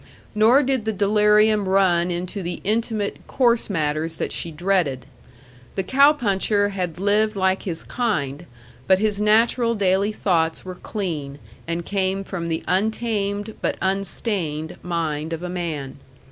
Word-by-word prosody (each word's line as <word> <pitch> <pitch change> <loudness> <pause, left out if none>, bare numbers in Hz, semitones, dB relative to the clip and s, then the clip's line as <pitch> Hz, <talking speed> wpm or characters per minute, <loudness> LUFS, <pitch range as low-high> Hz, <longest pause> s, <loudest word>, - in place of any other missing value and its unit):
Nor 230 +6 +5
did 260 -4 0
the 220 - 0
delirium 210 0 +3
run 180 -3 +3
into 180 +3 -4
the 175 0 -4
intimate, 215 -1 -1
coarse 240 -4 +2
matters 155 -2 -1
that - - -3
she 170 - -3
dreaded. 165 -6 0 0.7
The 195 - 0
cow 275 +8 +5
puncher 205 -6 +1
had 180 -5 -3
lived 210 +2 +2
like 190 -1 +1
his 170 -4 -4
kind, 170 - -2 0.4
but 190 - +5
his 210 0 0
natural 230 +2 +3
daily 200 0 +2
thoughts 165 -6 0
were 185 - -5
clean, 165 -8 -5 0.3
and 170 0 -3
came 195 -1 -1
from 175 -4 -5
the 160 -1 -2
untamed 205 +1 -1
but - - -1
unstained 190 -5 -1
mind 160 -2 -2
of 165 +1 -5
a 180 - -4
man. 155 -7 -4
195 Hz, 145 wpm, -22 LUFS, 170-215 Hz, 0.7 s, Nor